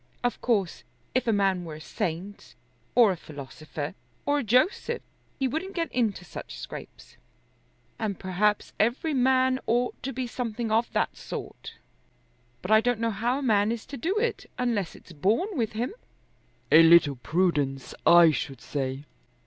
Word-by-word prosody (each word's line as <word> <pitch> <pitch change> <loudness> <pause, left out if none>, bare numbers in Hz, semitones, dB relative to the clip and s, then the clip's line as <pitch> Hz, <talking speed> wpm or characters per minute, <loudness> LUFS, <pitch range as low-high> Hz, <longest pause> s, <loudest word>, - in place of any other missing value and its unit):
Of 245 - -1
course 205 -8 0 0.3
if 255 -1 0
a - - +4
man 195 -3 +2
were 160 -3 -7
a - - -9
saint 175 +5 -5 0.4
or 235 -4 +7
a - - -1
philosopher 150 -1 -7 0.3
or 290 0 +2
a - - -2
Joseph 260 - +1 0.3
he 270 - +1
wouldn't 350 +9 -4
get 330 -2 -1
into 215 -7 0
such - - -8
scrapes, - - -10 0.8
and 210 -4 -2
perhaps 200 +3 0
every 245 +8 +1
man 260 0 +3
ought 240 +2 0
to 270 - -3
be 260 0 -3
something 235 -2 -3
of 225 +2 +2
that - - 0
sort. - - -8 0.9
But 185 - -3
I 220 0 +7
don't 245 -1 0
know 230 0 0
how 235 +5 0
a - - -3
man 210 -3 +3
is 230 -2 -4
to 285 - -8
do 355 - -1
it, 465 +2 -1
unless 230 -8 -1
it's - - -15
born 210 - +1
with 230 -6 -1
him." 240 - -2 0.8
"A 160 - +9
little 165 -4 +6
prudence 145 -3 0
I 170 -1 +8
should 140 -3 -4
say." 135 +2 -4
220 Hz, 165 wpm, -27 LUFS, 170-250 Hz, 0.9 s, A